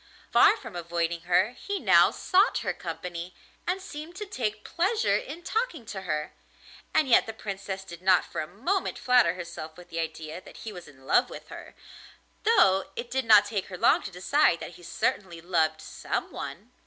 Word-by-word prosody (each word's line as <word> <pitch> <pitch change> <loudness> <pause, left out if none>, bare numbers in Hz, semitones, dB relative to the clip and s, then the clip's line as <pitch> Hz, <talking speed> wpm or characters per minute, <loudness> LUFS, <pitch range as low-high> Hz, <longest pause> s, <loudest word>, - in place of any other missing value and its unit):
Far - - +6
from 230 -7 -10
avoiding 170 -1 -2
her, 185 +5 +4
he 400 +10 -4
now - - +6
sought 390 +4 +2
her - - 0
company 175 0 -6 0.3
and 365 +2 0
seemed 330 -2 -8
to 420 - -5
take 215 - -3
pleasure 415 +7 +1
in 350 -9 -4
talking 440 - -2
to 200 -3 -6
her, 155 -4 -3 0.6
and 315 -2 +3
yet 240 - +5
the 225 - -5
Princess 195 -1 -5
did 175 -2 -11
not 185 -1 +4
for - - -4
a 155 - -5
moment 300 - -2
flatter 250 -9 +4
herself 170 -3 -8
with 180 - -13
the 165 - -3
idea 160 +1 -5
that - - -14
he 220 - -5
was 180 -3 -10
in 135 -3 -17
love 245 - +3
with - - -10
her, - - -10 0.7
though 195 - +4
it 235 0 -6
did 265 0 0
not 210 -2 +7
take 205 -2 -3
her 180 - -7
long - - +4
to - - -6
decide 185 - +2
that - - -7
he 175 +1 -15
certainly 175 0 -2
loved 160 -2 +1
someone. - - -5
195 Hz, 190 wpm, -27 LUFS, 170-265 Hz, 0.7 s, not